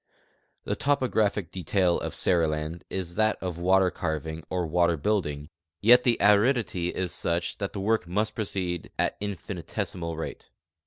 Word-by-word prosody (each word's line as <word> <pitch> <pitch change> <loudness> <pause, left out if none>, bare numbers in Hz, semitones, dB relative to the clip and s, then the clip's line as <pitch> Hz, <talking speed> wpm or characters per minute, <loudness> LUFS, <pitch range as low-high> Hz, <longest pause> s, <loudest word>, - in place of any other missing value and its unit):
The - - -2
topographic 110 - +1
detail 90 0 +1
of - - -4
Seriland 80 -1 +1
is 90 -3 -4
that 110 +2 +2
of 90 -3 -4
water 95 +1 +4
carving 80 -1 -4
or 90 -1 -1
water 85 +1 +2
building, 75 -5 -1 0.3
yet 120 +5 +6
the 120 -2 +4
aridity 105 -4 +3
is 90 -1 -2
such 85 +1 -1
that 100 -2 -3
the 100 - -4
work 105 -2 +1
must 105 +5 0
proceed 95 -5 -3
at - - +1
infinitesimal 90 -3 -4
rate. 80 - -6
90 Hz, 145 wpm, -27 LUFS, 85-105 Hz, 0.3 s, yet